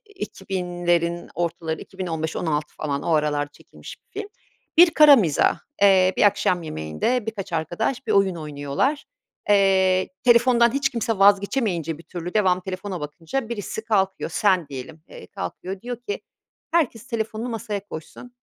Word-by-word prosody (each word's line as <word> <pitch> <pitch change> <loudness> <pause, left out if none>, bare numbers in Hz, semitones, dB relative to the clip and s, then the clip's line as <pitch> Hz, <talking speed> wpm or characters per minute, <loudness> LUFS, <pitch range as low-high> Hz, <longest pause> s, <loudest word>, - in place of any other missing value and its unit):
2000'lerin 175 - -2
ortaları, 170 -2 -3
2015-2016 160 -4 -3
falan 145 -2 -3
o 170 - -1
aralar 145 -1 +1
çekilmiş - - -13
bir 415 - -7
film. 415 - -7 0.5
Bir 345 0 +8
kara 300 -3 +8
mizah. 165 - +2 0.2
Eee, 190 -2 +6
bir - - +2
akşam 190 -3 +3
yemeğinde 155 - -2
birkaç 200 -4 -5
arkadaş 175 - -2
bir - - +1
oyun 195 -2 +3
oynuyorlar. 150 - -2 0.4
Eee, 190 -2 +4 0.2
telefondan 240 0 +5
hiç 275 0 +1
kimse 230 -3 -2
vazgeçemeyince 195 - +2
bir - - -12
türlü, 175 +2 -7
devamlı 185 -3 +2
telefona 190 -1 -5
bakınca 165 - -4
birisi 220 -1 -5
kalkıyor, 195 -4 0
sen 185 -7 +2
diyelim, 145 +4 -8
eee, - - -11
kalkıyor 195 -1 -6
diyor 245 0 -5
ki 410 - -2 0.5
herkes 255 -9 +1
telefonunu 225 -1 -3
masaya 220 -3 -4
koysun, 205 +8 -10
190 Hz, 140 wpm, -23 LUFS, 165-225 Hz, 0.5 s, Bir